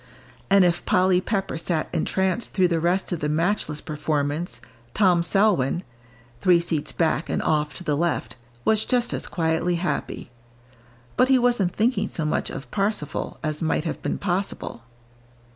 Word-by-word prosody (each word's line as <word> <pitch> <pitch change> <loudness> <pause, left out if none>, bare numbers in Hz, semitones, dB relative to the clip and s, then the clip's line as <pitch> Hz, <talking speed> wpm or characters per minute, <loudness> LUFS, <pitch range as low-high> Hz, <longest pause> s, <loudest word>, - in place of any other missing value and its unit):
And 195 -1 +6
if 175 0 +1
Polly 185 0 +3
Pepper 195 -5 -2
sat 165 -2 -1
entranced 190 +6 -1
through 185 -2 +3
the 165 -1 +1
rest 175 +4 0
of 175 - -1
the 150 - -1
matchless 155 -1 0
performance, 150 -2 -2 0.4
Tom 185 -5 +4
Selwyn 175 -4 +2 0.6
three 180 -2 +5
seats 165 -3 -1
back 165 -1 0
and - - 0
off 150 -1 0
to 180 - -8
the 150 -4 0
left 170 +3 -1 0.3
was 220 -1 +4
just 245 -1 +1
as - - -3
quietly 165 +1 0
happy. 170 -7 -3 0.9
But 255 - +5
he 265 - +6
wasn't 240 -7 +2
thinking 235 +4 +1
so 160 - -3
much 155 - -1
of 135 - -8
"Parsifal" 200 -7 -2
as 155 0 -2
might 160 -1 0
have 160 - -3
been - - -2
possible. 190 - -3
175 Hz, 160 wpm, -24 LUFS, 155-195 Hz, 0.9 s, And